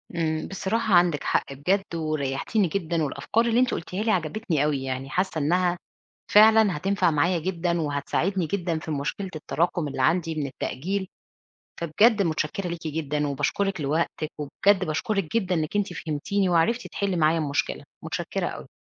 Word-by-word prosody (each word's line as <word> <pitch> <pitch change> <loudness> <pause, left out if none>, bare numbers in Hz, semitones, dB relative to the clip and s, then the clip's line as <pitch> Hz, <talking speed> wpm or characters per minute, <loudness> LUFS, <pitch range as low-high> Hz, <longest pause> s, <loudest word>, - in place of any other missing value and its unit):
إمم، 160 -2 -1
بصراحة 205 +2 -1
عندِك 175 -4 +4
حق - - 0
بجد 180 +6 -1
وريحتيني 155 +5 0
جدًا 165 -2 -1
والأفكار 225 - 0
اللي 235 +1 +2
أنتِ 255 0 +3
قُلتيها 180 +5 -3
لي 220 - +2
عجبتني 170 -3 0
أوي، 145 -3 0
يعني 130 +1 -4
حاسّة 180 0 -1
إنها 175 +4 +2 0.6
فعلًا 215 -2 +7
هتنفع 190 +2 +1
معايا 170 +4 +2
جدًا 170 0 -1
وهتساعدني 160 +5 -1
جدًا 170 -2 -1
في 160 - -7
مشكلة 155 +6 -3
التراكم 165 +1 -1
اللي 135 -2 -3
عندي 165 +4 +2
من 150 -2 -2
التأجيل. 185 +9 -3 0.8
فبجد 205 +7 +4
متشكرة 165 +2 -1
ليكِ 170 -2 -5
جدًا، 150 -1 -1
وباشكرِك 150 +6 -1
لوقتِك، 155 +1 -1
وبجد 185 +7 +2
باشكرِك 175 +4 -2
جدًا 185 -5 +1
إنِّك 155 +3 -2
أنتِ 200 -3 0
فهمتِني، 165 +6 -1
وعرفِتِ 225 +9 +2
تحلي 200 -2 -2
معايا 160 0 +3
المشكلة، 145 -2 -1 0.2
متشكرة - - -2
أوي. - - -7
170 Hz, 155 wpm, -25 LUFS, 150-195 Hz, 0.8 s, فعلًا